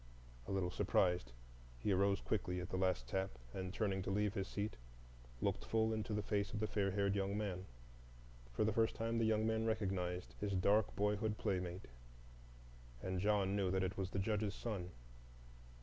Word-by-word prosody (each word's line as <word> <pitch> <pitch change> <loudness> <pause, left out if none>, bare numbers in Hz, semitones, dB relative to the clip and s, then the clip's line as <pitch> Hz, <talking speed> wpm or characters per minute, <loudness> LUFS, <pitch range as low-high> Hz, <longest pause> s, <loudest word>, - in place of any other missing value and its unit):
A - - -3
little 95 -2 0
surprised, 90 -9 +2 0.5
he 100 - 0
arose 100 +1 +3
quickly 90 -4 -1
at 90 0 -5
the - - -1
last 90 -9 +1
tap, 95 -4 -2 0.2
and, 95 -1 -3
turning 95 -2 0
to 95 - -3
leave 105 +1 +1
his 95 -1 -2
seat, 105 +1 -3 0.6
looked - - 0
full 110 0 +2
into 110 +1 -2
the 105 0 0
face 100 -1 0
of 105 - -1
the 110 - +1
fair 100 -2 +1
haired 100 0 +1
young 100 0 0
man. 95 -3 -3 0.8
For 60 - +1
the 110 -1 +2
first 110 +1 +2
time 115 +1 0
the 115 - +3
young 110 0 +3
man 110 0 +1
recognized 95 -5 -1
his 100 -1 -1
dark 100 +3 +3
boyhood 105 +1 +1
playmate, 90 -1 -2 1.2
and 95 0 -1
John 100 0 +2
knew 100 -2 +2
that 95 0 +1
it 95 +1 -1
was 95 -2 -2
the 95 - -4
Judge's 105 +1 0
son. 100 -7 -3
100 Hz, 180 wpm, -39 LUFS, 95-105 Hz, 1.2 s, arose